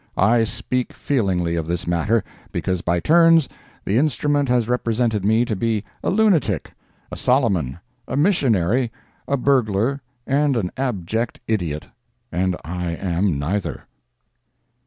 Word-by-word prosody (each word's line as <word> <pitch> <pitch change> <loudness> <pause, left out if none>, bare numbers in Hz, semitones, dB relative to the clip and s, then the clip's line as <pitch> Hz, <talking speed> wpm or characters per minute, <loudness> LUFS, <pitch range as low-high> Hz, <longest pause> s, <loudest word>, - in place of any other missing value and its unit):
I 115 +4 +4
speak 120 +2 -3
feelingly 95 -10 0
of 80 -2 -2
this 85 +1 -2
matter, 85 +7 +1 0.3
because 90 -2 -1
by 85 0 0
turns 165 - +5 0.4
the 105 +5 +2
instrument 145 -1 +1
has 120 -2 +2
represented 115 -3 0
me 110 +4 +3
to 115 -3 -2
be 110 0 -1 0.2
a - - +1
lunatic, 200 - +2 0.4
a - - -4
Soloman, 100 - +1 0.3
a 130 - -3
missionary, 125 - +2 0.4
a 140 - +1
burglar 125 -1 +1 0.2
and 140 -1 +2
an 90 -6 -1
abject 115 -3 -2
idiot, 85 -9 -1 0.5
and 90 +1 0
I 85 0 -3
am 90 -2 0
neither. 90 +8 -2
110 Hz, 130 wpm, -21 LUFS, 90-130 Hz, 0.5 s, turns